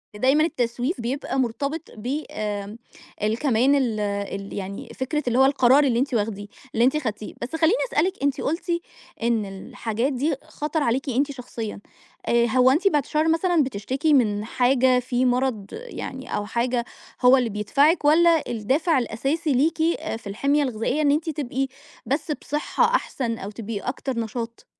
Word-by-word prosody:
دايمًا 270 +8 +3
التسويف 250 -2 -1
بيبقى 265 +2 -2
مرتبط 280 +7 -2
ب 260 +8 -3
آمم، 205 0 -4 0.5
ال 215 +2 +1
كمان 265 0 +3
ال 240 -6 0
ال 200 -1 -3
يعني 200 0 -6
فكرة 285 +3 -2
اللي 245 +2 +2
هو 265 - +7
القرار 270 0 +5
اللي 245 -4 +2
أنتِ 270 0 -1
واخديه 205 -2 -1 0.3
اللي 230 +2 +3
أنتِ 265 +4 +3
خدتيه 215 -7 -4
بس 245 +6 -4
خلّيني 320 +6 +3 0.2
أسألِك 365 +5 +2
أنتِ 285 -2 +1
قُلتِ، 335 +4 -2 0.5
إن 230 -3 +1
الحاجات 225 +6 -3
دي 285 +4 0
خَطَر 300 +1 -3
عليكِ 265 +3 0
أنتِ 275 +4 +1
شخصيًا، 235 -5 -6 0.5
آآ، 235 0 +4
هو 255 +2 +4
أنتِ 355 +8 +2
بِعِد 295 -6 +3
الشر 305 +3 0
مثلًا 330 -1 +3
بتشتكي 265 +6 -1
من 210 -5 +2
حاجة؟ 250 +1 +3
في 250 0 0
مرض 250 -4 +1
يعني 445 - -6
أو 205 - -2
حاجة، 235 +2 -1 0.4
هو 250 +1 +7
اللي 245 -3 +1
بيدفعِك 280 - +2
والَّا 325 +1 +5
الدافع 270 - +1
الأساسي 275 +6 -1
ليكِ 315 +5 +2 0.2
آآ، - - -4
في 225 - -12
الحِمية 280 +9 +1
الغذائية 250 +4 -1
إن 285 - +4
أنتِ 315 +3 0
تبقي، 270 -3 -2 0.4
بس 295 +3 -1
بصحة 295 +1 0
أحسن 235 - -2
أو 200 0 -6
تبقي 210 -1 -5
أكتر 250 0 -3
نشاط؟ 230 +1 -5
255 Hz, 165 wpm, -24 LUFS, 230-290 Hz, 0.5 s, هو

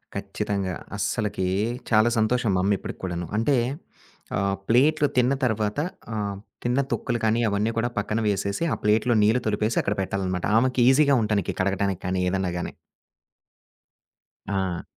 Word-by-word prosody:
ఖచ్చితంగా. 95 -3 -2 0.2
అస్సలకి 105 -4 -1 0.4
చాలా 110 +1 +5
సంతోషం 110 0 +2
మా 90 - +2
అమ్మ 100 +1 +3
ఇప్పటికి - - -7
కూడాను. 85 -1 -3
అంటే 135 +3 +2 0.8
ఆహ్, 100 -1 +1
ప్లేట్లు 145 +5 +4
తిన్న 125 +2 +4
తర్వాత 110 0 0 0.4
ఆహ్, 100 -1 -2 0.3
తిన్న 125 +3 +1
తొక్కులు 120 -2 -1
కానీ 110 +1 +2
అవన్నీ 105 +3 0
కూడా 120 +1 +1
పక్కన 105 +1 -1
వేసేసి 100 - -1
ఆ - - +1
ప్లేట్‌లో 110 +3 +3
నీళ్ళు 115 +4 +3
తొలిపేసి 110 +2 0
అక్కడ 100 - -1
పెట్టాలనమాట. 95 -1 -2
ఆమెకీజీగా 130 +3 +4
ఉంటానికి 105 -3 0
కడగటానికి 95 -1 0
కానీ 90 0 0
ఏదన్నా 95 -1 -1
గాని. 85 - -4 1.7
ఆ! 95 -3 -1
105 Hz, 135 wpm, -25 LUFS, 95-120 Hz, 1.7 s, చాలా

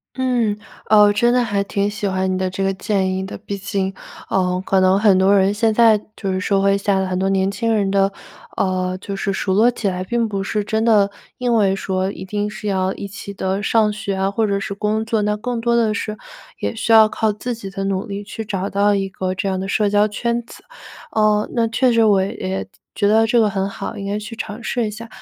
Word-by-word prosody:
嗯， 245 -5 0 0.3
呃， 210 -1 +6
我 205 0 +5
真 240 +3 +3
的 250 0 +3
还 205 -3 0
挺 200 0 -1
喜 205 0 -3
欢 190 0 0
你 - - 0
的 185 0 -1
这 190 +1 -3
个 195 0 +1
建 190 -1 -1
议 190 - -2
的， 190 - -7
毕 200 - -6
竟， 195 -1 -2 0.4
呃， 180 -1 +1
可 195 - +2
能 185 +1 +4
很 205 -2 +5
多 195 +2 +4
人 195 +1 +3
现 220 +1 +2
在 220 -1 +5 0.2
就 195 -2 -2
是 185 - -1
社 195 +1 +1
会 195 0 +3
下 200 0 +1
的 190 - 0
很 185 -1 -2
多 190 +1 +1
年 195 0 +1
轻 230 +3 -1
人 200 -3 +1
的， 195 0 +2 0.5
呃， 185 -1 0
就 200 0 -6
是 195 0 -2
熟 190 0 -1
络 220 +5 +5
起 240 -3 -3
来， 185 -1 -2
并 235 +4 0
不 200 -2 -3
是 210 +1 -1
真 220 +2 -1
的 210 -3 +4 0.3
因 245 -2 0
为 200 -4 +3
说 190 0 -2
一 190 - -8
定 205 +2 -2
是 210 0 -7
要 190 -1 0
一 200 - -6
起 200 0 -8
地 190 +1 -2
上 215 0 +2
学 210 -2 -3
啊 190 +1 0
或 220 +2 0
者 200 -1 0
是 200 0 -4
工 210 +2 -1
作， 225 -1 0
那 210 0 0
更 235 +2 -3
多 235 0 +1
的 225 -2 +2
是 215 -1 -4 0.4
也 - - -2
需 225 +1 -2
要 220 -1 +8
靠 220 0 0
自 225 +4 -4
己 225 -4 -7
的 195 0 -5
努 195 +2 -2
力 200 0 -5
去 220 +2 -6
找 195 -2 -3
到 205 +1 +2
一 195 -1 -1
个 185 0 -3
这 185 - -2
样 190 -1 -1
的 190 - -4
社 205 +1 +1
交 205 +1 +4
圈 235 +3 -2
子。 235 - -14 0.5
呃， 215 -1 +2 0.2
确 250 +1 +3
实 230 0 +4
我 200 -3 +4
也 95 - -4 0.3
觉 205 - +2
得 220 +2 +4
这 240 +1 +3
个 220 - +4
很 195 -1 -1
好， 200 +3 -6
应 200 -1 -6
该 205 +1 -1
去 210 +2 -7
尝 220 +1 -6
试 235 -1 -1
一 - - -3
下。 220 +2 -8
205 Hz, 265 characters per minute, -20 LUFS, 195-220 Hz, 0.5 s, 要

